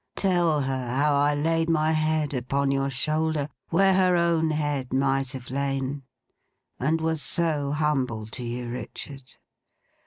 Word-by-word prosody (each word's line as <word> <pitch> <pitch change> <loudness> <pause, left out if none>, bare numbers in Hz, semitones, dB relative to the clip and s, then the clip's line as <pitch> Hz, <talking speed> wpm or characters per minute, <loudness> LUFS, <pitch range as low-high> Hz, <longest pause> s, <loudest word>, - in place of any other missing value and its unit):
Tell 175 -6 +2
her 130 -2 -2
how 145 +2 +3
I 145 +1 +3
laid 165 +2 +1
my 155 -1 +2
head 155 -2 +1
upon 135 +2 0
your 135 0 0
shoulder, 155 +2 0 0.2
where 190 +3 +4
her 185 -1 +4
own 170 -2 +2
head 145 -4 -1
might 135 0 +1
have 130 -2 -8
lain, 135 0 -2 0.8
and 155 +5 +1
was 160 -1 -1
so 150 -4 0
humble 135 -8 0
to 110 +4 -7
you, 120 0 -4
Richard. 135 +1 -7
145 Hz, 145 wpm, -26 LUFS, 135-160 Hz, 0.8 s, where